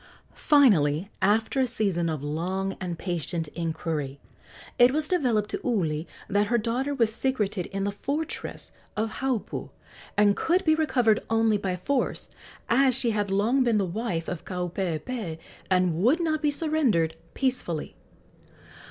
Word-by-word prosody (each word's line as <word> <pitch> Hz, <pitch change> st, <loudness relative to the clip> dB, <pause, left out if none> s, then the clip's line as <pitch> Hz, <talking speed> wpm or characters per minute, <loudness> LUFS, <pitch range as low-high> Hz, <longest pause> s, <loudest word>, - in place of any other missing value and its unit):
Finally, 195 Hz, -, +4 dB
after 220 Hz, +6 st, +2 dB
a 260 Hz, -, +3 dB
season 195 Hz, -8 st, 0 dB
of 155 Hz, -3 st, -3 dB
long 185 Hz, +6 st, -2 dB
and 175 Hz, -2 st, -3 dB
patient 170 Hz, -2 st, -3 dB
inquiry, 155 Hz, -4 st, -3 dB, 0.6 s
it 245 Hz, +1 st, +7 dB
was 305 Hz, +2 st, 0 dB
developed 240 Hz, -, +1 dB
to -, -, -3 dB
Uli 165 Hz, -9 st, 0 dB, 0.2 s
that 205 Hz, +1 st, +2 dB
her 240 Hz, -, +2 dB
daughter 240 Hz, +5 st, -1 dB
was 230 Hz, -4 st, +2 dB
secreted 220 Hz, -7 st, 0 dB
in 195 Hz, 0 st, -3 dB
the 200 Hz, -, 0 dB
fortress 280 Hz, +10 st, -4 dB, 0.3 s
of 220 Hz, +1 st, -2 dB
Haupu 265 Hz, -5 st, -2 dB, 0.5 s
and 205 Hz, -1 st, +5 dB
could 360 Hz, +3 st, +1 dB
be 315 Hz, -, +5 dB
recovered 250 Hz, -9 st, +2 dB
only 225 Hz, -2 st, +3 dB
by 190 Hz, -2 st, -1 dB
force, 255 Hz, +9 st, -1 dB, 0.4 s
as 260 Hz, +1 st, +4 dB
she 245 Hz, -3 st, +1 dB
had 205 Hz, -2 st, -1 dB
long 220 Hz, +7 st, +2 dB
been 235 Hz, -3 st, +2 dB
the 200 Hz, -, +2 dB
wife 180 Hz, -3 st, -3 dB
of 175 Hz, -3 st, -4 dB
Kaupeepee 180 Hz, +1 st, -3 dB, 0.3 s
and 180 Hz, -2 st, +3 dB
would 260 Hz, -, +4 dB
not 315 Hz, -3 st, 0 dB
be 300 Hz, -, +2 dB
surrendered 285 Hz, -, +1 dB, 0.2 s
peacefully. 250 Hz, -, -2 dB
210 Hz, 145 wpm, -26 LUFS, 175-255 Hz, 0.6 s, it